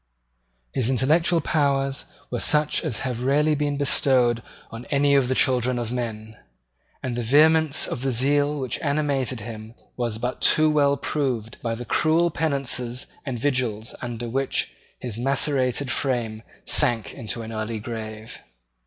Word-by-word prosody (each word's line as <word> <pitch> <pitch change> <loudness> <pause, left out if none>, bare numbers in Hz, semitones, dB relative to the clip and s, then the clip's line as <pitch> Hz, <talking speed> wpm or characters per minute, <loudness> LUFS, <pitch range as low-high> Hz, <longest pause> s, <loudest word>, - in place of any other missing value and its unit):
His 125 -2 +2
intellectual 155 +6 +3
powers 140 -2 0 0.3
were - - -2
such 150 +2 +4
as 140 -9 -1
have 125 -2 -3
rarely 150 +4 +2
been 145 -1 -1
bestowed 130 -4 +2 0.3
on 115 +2 -8
any 140 0 +2
of 135 -3 +3
the 130 - 0
children 125 -1 +2
of 120 -1 -3
men; 110 -3 -5 0.7
and 125 -2 -3
the 120 - -2
vehemence 155 +5 +4
of - - -4
the 135 0 0
zeal 145 +4 +1
which 130 -2 -3
animated 140 -5 -1
him 110 +1 -9 0.2
was 120 -3 -2
but 125 +2 -4
too 155 0 +4
well 140 -2 +2
proved 125 -8 -3
by 115 -1 -2
the 120 +2 -7
cruel 165 +7 +2
penances 135 -5 -1 0.2
and 130 -2 -3
vigils 120 -4 -1
under 120 -1 -5
which 135 +3 -2 0.3
his 115 -3 -5
macerated 135 0 +1
frame 120 -5 -2 0.2
sank 120 -7 +3
into 115 -2 -5
an 110 - -8
early 110 +1 -3
grave. 110 -1 -7
130 Hz, 150 wpm, -23 LUFS, 115-145 Hz, 0.7 s, such